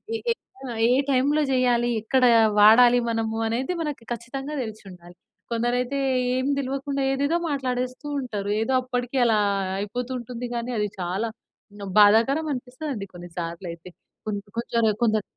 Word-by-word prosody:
ఏ - - 0
ఏ - - +3 0.3
ఆ! - - -6 0.2
ఏ - - +5 0.2
టైమ్‌లో 280 +4 +2
చేయాలి, 240 -1 +2
ఎక్కడ 255 +4 +1 0.4
వాడాలి 240 +3 +7
మనము 225 -1 -1
అనేది 250 +9 -1
మనకి 295 -7 -4
ఖచ్చితంగా 270 +5 -5
తెలిసి 220 -2 -8
ఉండాలి. 175 -1 -14 0.4
కొందరైతే 245 +3 0 0.4
ఏమి 260 +2 0
తెలవకుండా 275 +1 -2
ఏదేదో 285 +5 +1
మాట్లాడేస్తూ 255 0 -3 0.2
ఉంటారు. 205 -5 -4
ఏదో 245 +4 0
అప్పటికి 250 +1 -3
అలా 220 -2 +3 0.4
అయిపోతూ 245 +5 -4
ఉంటుంది 240 +1 -6
కానీ 235 +1 -3
అది 210 0 +1
చాలా 185 +6 -2 0.7
బాధాకరం 230 +9 +5
అనిపిస్తదండి 255 -3 -5
కొన్ని 175 0 -9
సార్లు 170 +1 -5
అయితే. 170 +2 -12 0.4
కొంద 205 -1 -2 0.2
కొందరు 230 -2 +1
కొంచెం 215 -2 +2
240 Hz, 140 wpm, -24 LUFS, 215-260 Hz, 0.7 s, వాడాలి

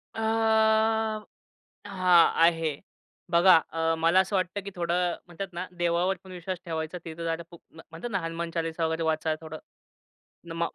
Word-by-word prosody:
अ, - - -5 1.7
हां, 180 -3 +4
आहे. 165 -4 +1 0.5
बघा 175 +2 +7 0.2
अ, 165 0 0
मला 165 +3 +4
असं 190 +2 +1
वाटत, 185 +1 -1
की 200 - -6
थोडं 175 0 0
म्हणतात 180 +2 -7
ना, 175 +2 -4
देवावर 175 +2 +1
पण 190 - -12
विश्वास 185 +1 -5
ठेवायचा. 160 +1 -4
तिथं 165 0 -7
जाणं 165 0 -2
खूप 170 - -14
म्हणतात 165 +7 -9
ना, 200 - 0
हनुमान 165 0 -4
चालीसा 165 0 -2
वगैरे 160 +1 -1
वाचा 160 0 0
थोडं. 160 -1 -8 0.9
नमा 170 0 -1
170 Hz, 150 wpm, -27 LUFS, 165-180 Hz, 1.7 s, बघा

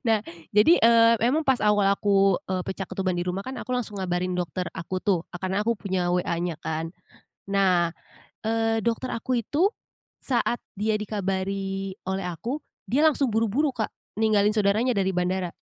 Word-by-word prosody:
nah 225 -1 +4 0.3
jadi, 210 +11 +6
eee, 230 0 +6 0.2
emang 310 +4 +1
pas 265 -2 +3
awal 210 -1 +3
aku, 195 -1 +3 0.2
eee, 185 -1 0
pecah 195 - -4
ketuban 185 -2 -1
di 175 - -1
rumah 180 +2 -3
kan 260 - -4
aku - - -9
langsung 235 -5 -2
ngabarin 180 0 -1
dokter 180 0 -2
aku 175 +3 -4
tuh, 185 -2 +1
e - - -7
karena 190 +3 -1
aku 230 0 0
punya 185 -3 -1
WA-nya 175 -2 -1
kan 160 +1 -3 0.6
nah, 185 -4 +2 0.5
eee, 225 0 +1
dokter 235 +2 -1
aku 235 +1 -1
itu 310 - +2 0.6
saat 240 -2 0 0.2
dia 215 +1 +1
dikabari 195 -2 -2
oleh 190 0 -2
aku 230 - -4 0.2
dia 260 +9 +1
langsung 285 -2 +3
buru-buru 230 +6 +1
Kak 220 -3 -2 0.3
ninggalin 210 -2 +3
saudaranya 215 +4 +2
dari 190 -2 +1
bandara. 180 0 0
200 Hz, 165 wpm, -25 LUFS, 185-230 Hz, 0.6 s, jadi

